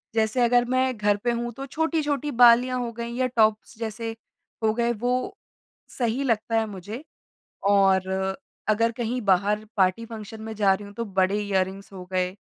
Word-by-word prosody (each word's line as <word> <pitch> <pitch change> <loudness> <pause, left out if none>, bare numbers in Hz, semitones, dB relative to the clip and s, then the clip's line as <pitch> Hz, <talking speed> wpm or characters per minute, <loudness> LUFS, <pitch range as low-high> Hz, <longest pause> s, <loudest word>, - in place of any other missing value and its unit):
जैसे 220 +2 +1
अगर 245 0 +4
मैं 255 0 +1
घर 205 -1 +2
पे 240 - +2
हूँ 240 0 -2
तो 270 +3 -7
छोटी-छोटी 295 -1 -1
बालियाँ 245 +1 +5
हो 240 -1 -3
गई 235 +1 -5
या 255 +1 +1
टॉप्स 220 -2 +1
जैसे 225 0 -4 0.5
हो 215 -1 +3
गए, 235 +1 +1
वो 245 +3 -1 0.6
सही 245 +2 0
लगता 225 -2 +1
है 220 - 0
मुझे। 210 - -8 0.7
और 190 -2 +4 0.6
अगर 230 +2 +3
कहीं 245 +1 -2
बाहर 205 +1 +2
पार्टी, 190 +4 +2
फंक्शन 220 -1 -9
में 220 0 -6
जा 200 -2 +4
रही 205 +1 -5
हूँ 200 - -12
तो 230 - -3
बड़े 195 0 +1
इयररिंग्स 195 0 -2
हो 185 -1 -8
गए 185 0 0
225 Hz, 175 wpm, -25 LUFS, 205-245 Hz, 0.7 s, बालियाँ